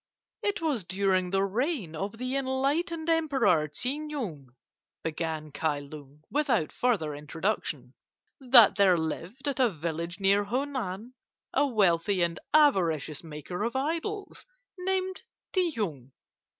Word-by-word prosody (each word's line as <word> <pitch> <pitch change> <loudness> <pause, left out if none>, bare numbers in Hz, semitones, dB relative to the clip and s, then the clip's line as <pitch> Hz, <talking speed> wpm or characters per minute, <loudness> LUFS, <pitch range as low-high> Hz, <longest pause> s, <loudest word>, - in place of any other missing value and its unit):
"It 410 -2 -1
was 280 - 0
during 185 0 +1
the 195 +1 +2
reign 215 - -1
of 200 +7 -4
the 255 +2 -3
enlightened 280 +5 0
Emperor 275 - +3
Tsing 265 - -3
Nung," 200 - -5 0.6
began 160 -1 -3
Kai 150 0 0
Lung, 145 0 -11
without 260 - +1
further 200 -12 0
introduction, 160 +8 -3 0.5
"that 245 -5 +7
there 190 -3 +5
lived 175 - -4
at 275 -2 -1
a 250 -2 +5
village 170 +1 -4
near 200 +1 +3
Honan 245 -3 -3 0.4
a 285 +2 +3
wealthy 195 -5 +2
and 170 0 -1
avaricious 175 - +3
maker 160 +4 -6
of 235 +3 -2
idols, 335 - -3 0.3
named 375 0 -1 0.3
Ti 365 -2 +2
Hung. 150 - -4
205 Hz, 125 wpm, -28 LUFS, -, 0.6 s, that